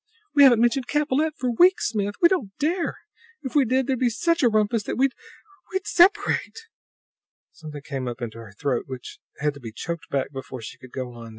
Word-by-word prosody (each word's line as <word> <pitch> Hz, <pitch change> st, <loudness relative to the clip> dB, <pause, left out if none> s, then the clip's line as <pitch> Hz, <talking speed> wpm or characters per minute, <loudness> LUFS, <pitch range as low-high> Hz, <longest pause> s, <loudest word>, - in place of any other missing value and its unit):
"We 290 Hz, -, +5 dB
haven't 245 Hz, -5 st, +7 dB
mentioned 240 Hz, +2 st, +2 dB
Capellette 300 Hz, +1 st, 0 dB
for 250 Hz, -1 st, -1 dB
weeks, 370 Hz, -, +4 dB
Smith! 205 Hz, -2 st, -2 dB
We -, -, +10 dB
don't 255 Hz, -, -2 dB
dare! 330 Hz, +4 st, -1 dB, 0.5 s
If 260 Hz, -, -5 dB
we 285 Hz, -3 st, +4 dB
did, 260 Hz, +2 st, +1 dB
there'd 260 Hz, -2 st, -1 dB
be 250 Hz, -, +3 dB
such 335 Hz, +8 st, 0 dB
a 245 Hz, -, +5 dB
rumpus 215 Hz, +1 st, +1 dB
that -, -, -4 dB
we 270 Hz, +2 st, +4 dB, 0.6 s
we'd 380 Hz, 0 st, -2 dB
separate!" 405 Hz, +4 st, +3 dB, 0.9 s
Something 150 Hz, -3 st, -10 dB
came 135 Hz, -3 st, -4 dB
up 120 Hz, +1 st, -5 dB
into 115 Hz, -2 st, -6 dB
her 110 Hz, -3 st, -11 dB
throat 135 Hz, -4 st, -1 dB
which 130 Hz, -2 st, -8 dB, 0.2 s
had 150 Hz, 0 st, 0 dB
to 140 Hz, -, -12 dB
be 115 Hz, -4 st, -8 dB
choked 170 Hz, +8 st, -6 dB
back 135 Hz, -1 st, -1 dB
before 135 Hz, -2 st, -7 dB
she 110 Hz, -, -9 dB
could 130 Hz, -, -14 dB
go 130 Hz, -2 st, -5 dB
on. 115 Hz, -1 st, -10 dB
230 Hz, 205 wpm, -24 LUFS, -, 0.9 s, We